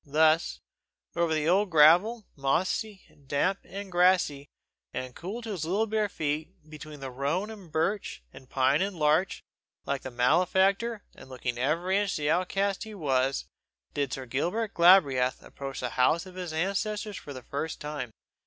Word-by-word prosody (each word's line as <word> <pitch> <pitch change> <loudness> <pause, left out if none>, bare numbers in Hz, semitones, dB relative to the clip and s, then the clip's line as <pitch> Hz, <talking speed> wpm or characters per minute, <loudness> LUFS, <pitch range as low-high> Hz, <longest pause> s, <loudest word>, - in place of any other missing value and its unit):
Thus, 155 +3 +2 0.5
over 170 -1 +1
the 155 -1 0
old 195 +4 +3
gravel, 180 +8 +5
mossy 185 +9 -1
and 140 -2 -25
damp 180 +8 +1
and 195 0 -8
grassy, 175 -6 +3 0.4
and 130 0 -5
cool 205 +8 -6
to 225 - -5
his 180 -6 -3
little 195 +7 +1
bare 215 -1 0
feet, 155 -2 -2 0.2
between 150 -1 -10
rowan 140 - -2
and 195 -7 -12
birk 175 +7 +1 0.3
and 130 - -14
pine 135 +3 +2
and 195 -1 -2
larch, 155 +4 +1 0.4
like 140 -1 -2
a 130 - -5
malefactor, 190 - +2
and - - -14
looking 125 -2 -4
every 170 +9 +1
inch 205 -1 -1
the 150 0 0
outcast 195 +3 0
he 220 -1 -9
was, 135 -5 0 0.5
did 140 -3 -1
Sir 130 0 -4
Gilbert 180 - -2
Galbraith 145 -8 +5
approach 135 -1 -7
the 125 - -2
house 140 +9 +2
of 185 - -11
his 180 -2 -5
ancestors 200 +5 -2
for 145 - -9
the 130 -3 -8
first 155 +3 -4
time. 150 -5 -5
160 Hz, 165 wpm, -28 LUFS, 140-195 Hz, 0.5 s, gravel